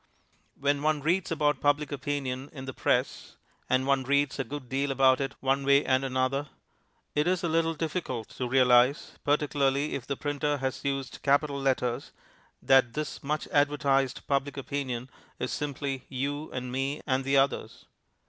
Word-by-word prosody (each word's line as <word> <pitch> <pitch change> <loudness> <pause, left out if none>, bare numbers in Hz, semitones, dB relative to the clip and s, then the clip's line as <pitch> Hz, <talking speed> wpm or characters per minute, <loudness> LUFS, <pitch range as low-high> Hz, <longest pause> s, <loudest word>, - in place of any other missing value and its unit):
When 145 0 +1
one 155 -1 +1
reads 175 +3 +1
about 150 -2 +1
Public 145 0 +2
Opinion 135 -1 -3
in 130 -2 -7
the 130 - -6
press - - -1 0.3
(and 130 +1 +2
one 135 -1 +2
reads 140 +1 +1
a - - +1
good 135 +1 -7
deal 135 +3 -1
about 135 0 +4
it 135 - -3
one 135 +1 +1
way 140 +1 +4
and 130 +1 +2
another), 135 +2 -1 0.6
it 150 +2 +1
is 185 0 +1
a - - +1
little 165 0 +1
difficult 150 - -3
to 125 - -4
realize, 125 +1 +4
particularly 145 -1 +1
if 130 - -5
the 140 - -2
printer 145 0 -1
has 130 -1 -3
used 135 -2 -3
capital 140 0 +2
letters, 125 -3 -1 0.5
that 130 -3 +5
this 150 0 -4
much 150 +2 -2
advertised 140 -2 +1
Public 140 0 -1
Opinion 130 -3 -3 0.3
is 125 - -3
simply 140 -2 -3
You 145 +3 -3
and 125 -1 -5
Me 135 +3 -2
and 130 -1 +1
the 135 +1 +2
Others. 135 +1 0
140 Hz, 165 wpm, -28 LUFS, 130-145 Hz, 0.6 s, that